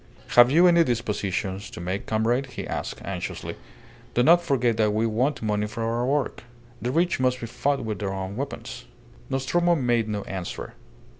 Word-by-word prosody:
"Have 120 0 +7
you 165 +6 +5
any 170 -1 +6
dispositions 105 - -2
to - - -9
make, 95 +3 -3
comrade?" 115 +5 +1
he 130 - -6
asked, - - -5
anxiously. - - -4 0.6
"Do 120 - +4
not 170 +5 +6
forget 125 -8 +1
that 105 -1 +2
we 110 +1 +2
want 120 +5 0
money 105 -1 0
for 110 +2 -5
our 115 +2 0
work. 145 0 -1 0.4
The 120 - -1
rich 170 +5 +1
must 125 0 +1
be 115 - -5
fought 135 +2 -1
with 110 -1 -3
their 100 -2 -2
own 95 0 -4
weapons." 140 +4 -6 0.4
Nostromo 170 +7 +2
made 120 -6 +1
no 105 -1 -2
answer. 95 -2 -6
120 Hz, 175 wpm, -25 LUFS, 105-135 Hz, 0.6 s, Have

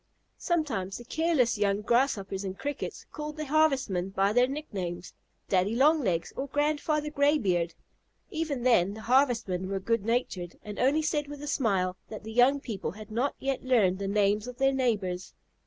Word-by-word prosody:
Sometimes 260 - -1
the 240 - -11
careless 260 -7 +1
young 200 0 +1
Grasshoppers 205 -5 +1
and 190 -1 -5
Crickets 285 +1 -5
called 300 0 -6
the 305 - -3
Harvestmen 270 - +2
by 195 +1 +1
their 245 +2 +4
nicknames, 185 - -5 0.3
"Daddy 190 +3 +1
Long 300 +5 +4
Legs" 170 -5 -1
or 275 - -3
"Grandfather 300 +1 0
Graybeard." 230 - +2 0.6
Even 310 -6 -2
then 205 -6 +3
the 220 - -9
Harvestmen 230 -7 +2
were 195 0 -1
good 230 +2 0
natured, 205 -7 -2
and 210 -1 -7
only 285 +5 +3
said 300 -1 0
with 290 0 -8
a - - -5
smile 195 -10 0
that 215 -2 -8
the 220 +1 -7
young 255 +4 +5
people 215 - -4
had 215 +1 -11
not 245 +6 0
yet 270 -1 -2
learned 210 -8 +3
the 200 - -2
names 205 +2 +1
of 250 -1 -8
their 270 0 +3
neighbors. 205 -9 -1
235 Hz, 170 wpm, -28 LUFS, 195-285 Hz, 0.6 s, young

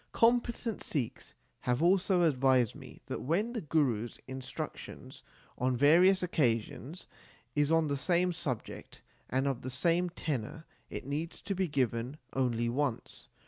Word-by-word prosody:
Competent 235 -1 +2
Sikhs 135 -8 -3 0.2
have 125 +5 0
also 180 0 +4
advised 130 -6 +3
me - - -12
that - - -4
when 200 - 0
the 230 - -2
Guru 140 -8 +1
s 120 - -10
instruction 130 -1 -7 0.5
on 125 0 +1
various 180 +8 +6
occasions 140 0 -1 0.5
is 145 +1 +2
on 165 -1 +4
the 145 -1 0
same 180 +4 +2
subject 125 -8 -5 0.3
and 130 +2 +1
of 135 -3 -1
the 130 - -5
same 170 +7 +1
tenor, 155 -1 -4 0.2
it - - -6
needs 150 +5 -3
be 190 -2 -1
given 130 -1 -1 0.2
only 120 -3 +1
once. 130 0 -2
145 Hz, 140 wpm, -31 LUFS, 125-175 Hz, 0.5 s, various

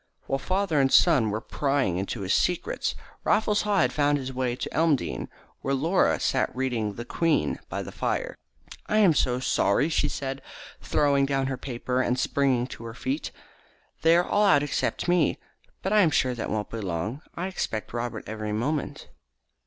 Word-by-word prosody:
While 135 - -1
father 185 0 +1
and 135 0 +2
son 140 -11 +5
were 105 +1 -1
prying 135 -9 0
into 100 +3 -3
his 95 0 0
secrets, 180 - 0 0.3
Raffles 210 -1 +2
Haw 205 -1 +2
had 125 0 +1
found 145 +2 +2
his 130 -1 -5
way 125 -1 -1
to - - -5
Elmdene, 155 -4 0 0.3
where 135 +1 0
Laura 165 +8 +2
sat 135 - +1
reading 120 -6 -1
the 120 - -6
Queen 165 +4 0
by - - -3
the - - -8
fire. - - -2 0.5
"I 215 - +1
am 200 -6 +6
so 125 -4 +1
sorry," 145 +3 +2
she 160 - +1
said, 135 0 -4 0.4
throwing 140 -2 +2
down 135 -1 0
her 135 0 -2
paper 125 0 -2
and 125 0 0
springing 130 -3 +1
to 115 - -9
her 115 0 -7
feet. 270 - -3 0.7
"They 165 +1 +5
are 175 - +2
all 210 +1 +3
out 145 -5 +5
except 145 - -1
me. 175 -4 +3 0.5
But 190 - 0
I 215 - +6
am 175 - +5
sure 130 -4 +1
that 120 - -4
they - - -5
won't 105 -1 -2
be 115 - -4
long. 95 - -3
I 175 - -3
expect 115 - -4
Robert 120 -1 -3
every 110 -1 -4
moment." 140 +7 -2
135 Hz, 185 wpm, -26 LUFS, 120-165 Hz, 0.7 s, am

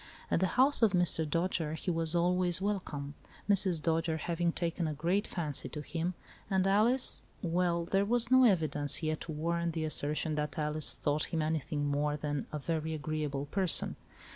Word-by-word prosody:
At - - +3
the 190 - +2
house 270 +2 +4
of 220 -4 +4
Mr. 175 -3 +3
Dojere 165 -1 -1
he 180 - -2
was 165 0 0
always 180 0 +2
welcome, 180 -8 -3 0.3
Mrs. 190 -4 +3
Dojere 160 0 0
having 170 +1 -1
taken 170 0 -2
a 155 - -3
great 175 +7 0
fancy 155 -6 -2
to 150 - -6
him, 170 +4 -3 0.3
and 190 -2 +2
Alice 220 +7 +3
— - - -32
well, 170 0 0
there 195 +3 +1
was 240 +3 +1
no 260 0 +7
evidence 155 - +2
yet 155 0 -1
to 165 - -6
warrant 170 +2 -1
the 160 -1 -2
assertion 155 +1 0
that 150 +2 -3
Alice 150 0 0
thought 150 +1 0
him 160 -2 -2
anything 155 -1 -2
more 145 +1 0
than 145 -2 -3
a 150 - -3
very 160 +1 -2
agreeable 150 -1 -3
person. 185 +3 0
165 Hz, 180 wpm, -31 LUFS, 150-180 Hz, 0.3 s, no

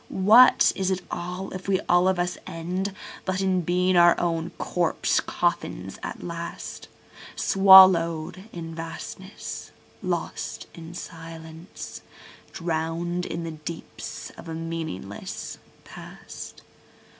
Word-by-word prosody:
What 220 +7 +6
is 190 -1 0
it 185 -1 -1
all, 180 +2 -4
if 185 0 -7
we 190 -1 +2
all 175 +1 +3
of 190 -1 +2
us 180 0 0
end 185 +3 -3 0.3
but 185 0 -1
in 190 -1 +2
being 180 +2 +2
our 175 0 +6
own 165 -1 -1
corpse 175 -2 +1
coffins - - -2
at - - -6
last, 170 -1 -6 0.5
Swallow'd 185 -3 +6
in 165 -1 -7
Vastness, 165 +4 -7 0.3
lost - - -3
in 165 0 -10
Silence, 165 0 -9 0.5
drown'd 170 +1 -2
in 170 +1 -4
the 165 - -4
deeps 160 +1 -7
of 165 - -9
a 160 - -4
meaningless 160 - -5 0.2
Past? - - -10
175 Hz, 115 wpm, -25 LUFS, 165-185 Hz, 0.5 s, What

